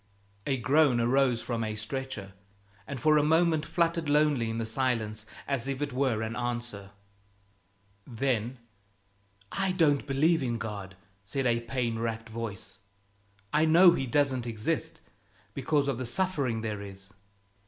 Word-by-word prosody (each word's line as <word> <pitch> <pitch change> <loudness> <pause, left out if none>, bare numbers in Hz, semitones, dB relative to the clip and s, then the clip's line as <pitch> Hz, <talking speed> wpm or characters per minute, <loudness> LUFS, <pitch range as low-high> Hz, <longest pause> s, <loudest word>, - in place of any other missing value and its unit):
A 135 -2 +1
groan 135 0 +3
arose 125 0 +2
from 115 -2 -2
a 110 -1 -3
stretcher, 110 -3 -5 0.5
and 140 - -5
for 155 +1 +4
a - - +2
moment 160 0 +3
fluttered 165 -1 0
lonely 145 -6 +3
in 115 - -3
the 115 - -1
silence 110 -3 -1 0.2
as 135 -3 -1
if 135 -1 -2
it 145 -2 -3
were 125 -4 +1
an 110 +1 -4
answer. 120 -5 -4 1.2
Then, 125 -1 -1 0.9
"I 195 -1 0
don't 150 -6 +2
believe 155 +4 +3
in 120 -3 -1
God," 100 -4 -6 0.3
said 130 +7 -2
a 120 -1 +3
pain 115 -1 -2
racked 115 0 -3
voice; 110 -3 -6 0.7
"I 155 +1 +4
know 170 +3 +7
He 135 -6 -1
doesn't 130 -2 +1
exist 110 -2 -2 0.5
because 140 +1 +1
of 135 -3 -1
the 130 - -3
suffering 140 -7 0
there 105 -2 -3
is. 100 0 -10
125 Hz, 145 wpm, -29 LUFS, 115-145 Hz, 1.2 s, know